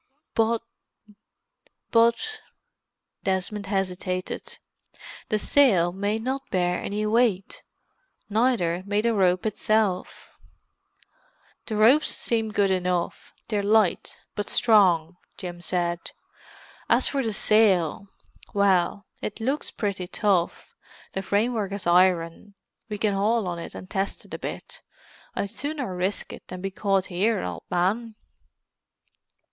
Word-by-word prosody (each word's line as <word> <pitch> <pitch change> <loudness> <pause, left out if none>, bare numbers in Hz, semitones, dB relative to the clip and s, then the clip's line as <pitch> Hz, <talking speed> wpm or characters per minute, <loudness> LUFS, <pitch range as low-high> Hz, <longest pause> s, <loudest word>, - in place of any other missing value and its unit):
"But——" 225 0 +1 2.6
Desmond 195 +2 -2
hesitated. 185 -2 -3 0.7
"The 215 - +2
sail 205 -8 +4
may 200 +3 -1
not 265 +4 -4
bear 180 -1 0
any 210 +1 -2
weight—neither 215 - -1
may 205 +1 +1
the 230 +1 +1
rope 185 -2 +2
itself." 215 -3 0 1.4
"The 220 - -2
ropes 240 +8 +5
seem 225 -2 -1
good 200 -2 +2
enough—they're 180 +3 -2
light, 210 -1 +1
but 205 -1 -4
strong," 180 -7 +4 0.2
Jim 175 -2 -7
said. 175 0 -1 0.9
"As - - +4
for 275 - 0
the 225 -4 -1
sail—well, 200 -1 +1 0.2
it 210 - -4
looks 265 +6 -1
pretty 195 -4 -3
tough; 190 -3 0 0.4
the 190 - -2
framework 205 0 0
is 200 -2 -5
iron. 175 +2 +2 0.3
We 210 - -3
can 205 0 +1
haul 210 +1 +1
on 175 -1 -3
it - - -8
and 185 - -8
test 195 0 -3
it - - -13
a - - -4
bit. - - -7 0.5
I'd 200 - -2
sooner 285 -9 -3
risk 185 +3 -2
it - - -12
than 185 - -7
be 195 +1 -3
caught 195 -1 +1
here, 200 +5 0
old 85 -2 -5
man." 215 +6 0
200 Hz, 115 wpm, -25 LUFS, 180-220 Hz, 2.6 s, ropes